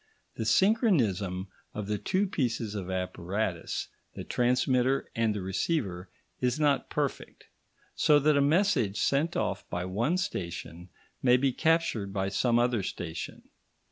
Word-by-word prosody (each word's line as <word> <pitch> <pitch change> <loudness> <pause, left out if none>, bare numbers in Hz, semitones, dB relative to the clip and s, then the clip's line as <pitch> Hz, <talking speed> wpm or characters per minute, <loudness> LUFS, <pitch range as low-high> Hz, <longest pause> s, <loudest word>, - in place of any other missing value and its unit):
The 110 - -4
synchronism 115 - +2 0.3
of 105 - -3
the 105 0 -2
two 190 +2 +1
pieces 120 - -2
of 95 -3 -5
apparatus, 90 0 -3 0.3
the - - -6
transmitter 125 +1 +1
and 115 -2 +1
the 100 - -3
receiver, 95 - -2 0.3
is 125 +3 0
not 145 -2 +2
perfect, - - -3 0.5
so 150 - +4
that 150 +1 +3
a 140 - +4
message 145 - +2
sent 145 +4 +1
off - - -2
by 90 +1 -3
one 115 - 0
station 90 - -5 0.3
may 125 -1 +5
be 135 0 +1
captured 160 -11 +1
by 95 -1 -1
some 120 +4 +2
other 120 -2 +2
station. 85 -3 -6
115 Hz, 140 wpm, -29 LUFS, 95-140 Hz, 0.5 s, may